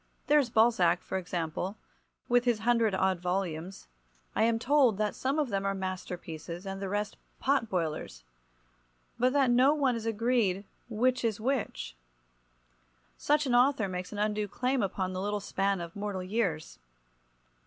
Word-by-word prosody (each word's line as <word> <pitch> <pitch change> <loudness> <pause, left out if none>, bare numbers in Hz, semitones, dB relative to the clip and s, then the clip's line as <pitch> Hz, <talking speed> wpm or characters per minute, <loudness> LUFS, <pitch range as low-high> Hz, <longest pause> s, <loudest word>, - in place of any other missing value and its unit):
There 300 +1 +5
is 265 -4 0
Balzac, 220 -7 +3
for 190 - -2
example, 175 +2 -3 0.5
with 245 0 +3
his 240 -2 +3
hundred 230 -3 +2
odd 190 -1 +1
volumes. 180 0 -3 0.5
I - - +1
am 225 0 +3
told 255 -3 +3
that 210 0 0
some 270 +3 -1
of 295 -4 +1
them 195 -2 -1
are 195 0 0
masterpieces 180 -2 -6
and 195 0 -5
the 195 - -3
rest 205 +1 -2 0.2
pot 270 -5 +1
boilers, 155 - -3 1.0
but 250 +2 +3
that 275 -3 +3
no 260 +5 +5
one 270 -5 +2
is 230 -1 -4
agreed 225 -4 +1 0.2
which 250 +3 +1
is 220 -3 0
which. 220 - -2 1.2
Such 295 +1 +1
an 255 - 0
author 245 -3 +4
makes 180 -1 -5
an 210 - -6
undue 210 0 0
claim 250 +5 0
upon 190 -1 -2
the 185 - -3
little 205 +1 -1
span 195 -1 -1
of 170 -1 -7
mortal 200 -2 -3
years. 185 - -2
205 Hz, 160 wpm, -30 LUFS, 185-245 Hz, 1.2 s, There